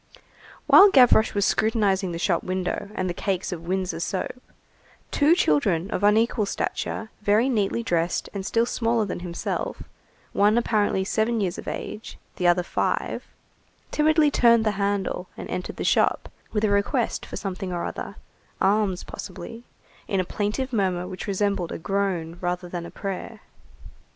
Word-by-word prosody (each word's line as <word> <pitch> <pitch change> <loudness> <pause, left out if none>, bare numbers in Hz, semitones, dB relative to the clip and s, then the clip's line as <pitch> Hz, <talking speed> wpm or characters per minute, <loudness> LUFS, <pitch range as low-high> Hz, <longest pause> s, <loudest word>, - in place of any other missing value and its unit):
While 405 - +9
Gavroche 245 - +5
was 200 0 +2
scrutinizing 205 -4 +1
the 170 - -4
shop 170 0 +1
window 185 +1 -3
and 185 - -1
the 175 - -2
cakes 190 +1 -2
of 170 -1 -6
windsor 185 -2 -1
soap, 195 +7 -3 0.7
two 305 +3 +4
children 165 - +1
of - - -2
unequal 215 +1 +3
stature, 220 +2 -3
very 210 +4 +3
neatly 230 -2 0
dressed, 170 -4 0
and 200 -2 -4
still 230 +4 +1
smaller 230 -2 0
than 190 - -4
himself, 175 -1 -4 0.5
one 210 +3 +4
apparently 215 -4 +1
about 190 - -3
seven 225 +1 +1
years 185 -4 -2
of - - -10
age, 215 - -6 0.2
the 180 - +1
other 175 +1 +4
five, - - -2 0.7
timidly 305 0 +3
turned 235 -4 +4
the 215 - +3
handle 200 -2 -1
and - - -6
entered 180 - -4
the - - -4
shop, - - +2 0.2
with 210 -1 -1
a 210 - +3
request 225 +5 0
for - - -8
something 190 -1 -4
or 175 -1 -2
other, - - -6 0.4
alms 195 -2 +2
possibly, 230 +1 -8 0.4
in 195 - 0
a 185 - 0
plaintive 215 +8 -2
murmur 185 -4 0
which 185 - -7
resembled 200 -3 0
a - - -4
groan 180 -3 -2
rather 180 0 -2
than 175 -1 -5
a - - -9
prayer. 200 +2 -6
200 Hz, 160 wpm, -25 LUFS, 180-220 Hz, 0.7 s, While